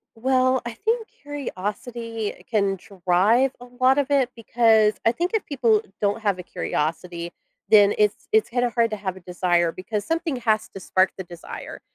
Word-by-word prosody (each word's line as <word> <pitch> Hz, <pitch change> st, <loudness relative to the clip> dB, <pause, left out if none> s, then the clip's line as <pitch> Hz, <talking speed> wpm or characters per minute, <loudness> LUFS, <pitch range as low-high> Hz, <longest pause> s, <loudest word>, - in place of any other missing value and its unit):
Well, 255 Hz, +2 st, +2 dB
I 235 Hz, -, -4 dB
think 450 Hz, -, -1 dB
curiosity 230 Hz, -4 st, -5 dB
can 200 Hz, -3 st, +1 dB, 0.3 s
drive 215 Hz, +9 st, +4 dB
a -, -, -9 dB
lot 260 Hz, +2 st, +4 dB
of 285 Hz, -2 st, +2 dB
it, 275 Hz, -3 st, +3 dB
because 225 Hz, -2 st, +3 dB
I 225 Hz, -, +5 dB
think 345 Hz, +8 st, -2 dB
if 440 Hz, -, 0 dB
people 235 Hz, -7 st, +2 dB, 0.2 s
don't 205 Hz, +2 st, 0 dB
have 200 Hz, -4 st, 0 dB
a -, -, -6 dB
curiosity, 170 Hz, +1 st, -3 dB, 0.4 s
then 205 Hz, -1 st, +6 dB
it's 210 Hz, -1 st, +1 dB
it's 220 Hz, 0 st, +3 dB
kinda 245 Hz, 0 st, +1 dB
hard 230 Hz, 0 st, +2 dB
to -, -, -1 dB
have 190 Hz, -2 st, -4 dB
a -, -, -11 dB
desire- 175 Hz, -1 st, +1 dB
because 205 Hz, +4 st, -4 dB
something 330 Hz, -3 st, -1 dB
has 220 Hz, -3 st, +1 dB
to -, -, -9 dB
spark 185 Hz, 0 st, +2 dB
the 190 Hz, -, -5 dB
desire. 175 Hz, -2 st, -9 dB
220 Hz, 175 wpm, -23 LUFS, 190-255 Hz, 0.4 s, then